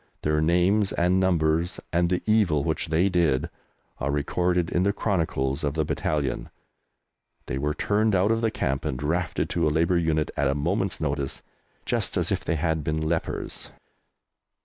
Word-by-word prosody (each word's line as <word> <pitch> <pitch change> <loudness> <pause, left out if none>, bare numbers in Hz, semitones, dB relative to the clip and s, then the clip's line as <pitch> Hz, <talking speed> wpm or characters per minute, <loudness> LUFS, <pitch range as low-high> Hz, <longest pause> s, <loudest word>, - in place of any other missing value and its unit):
Their 75 0 +1
names 90 +5 +3
and 90 +2 +2
numbers, 85 -2 +1
and 85 0 +2
the 90 0 0
evil 100 -10 +3
which 80 +1 -1
they 80 +4 +2
did, 85 -8 +1 0.5
are 70 - -1
recorded 85 +4 0
in 90 - +1
the 100 +2 +2
chronicles 80 -9 -1
of 70 0 -1
the 80 -1 +1
battalion. 75 -2 -2 1.0
They 65 - -3
were 75 +1 -1
turned 105 0 +1
out 95 +4 +3
of 115 0 +1
the 115 - +2
camp 70 -9 -2
and 65 - -2
drafted 80 +6 -1
to - - +1
a - - +4
Labour 85 +4 +2
unit 80 -2 0
at 70 - +1
a 70 - +1
moment's 90 +6 -1
notice, 70 -2 -2 0.4
just - - 0
as - - 0
if - - -1
they 80 - 0
had 80 -1 0
been 75 +2 -1
lepers. 80 +1 -3
80 Hz, 170 wpm, -25 LUFS, 75-90 Hz, 1.0 s, a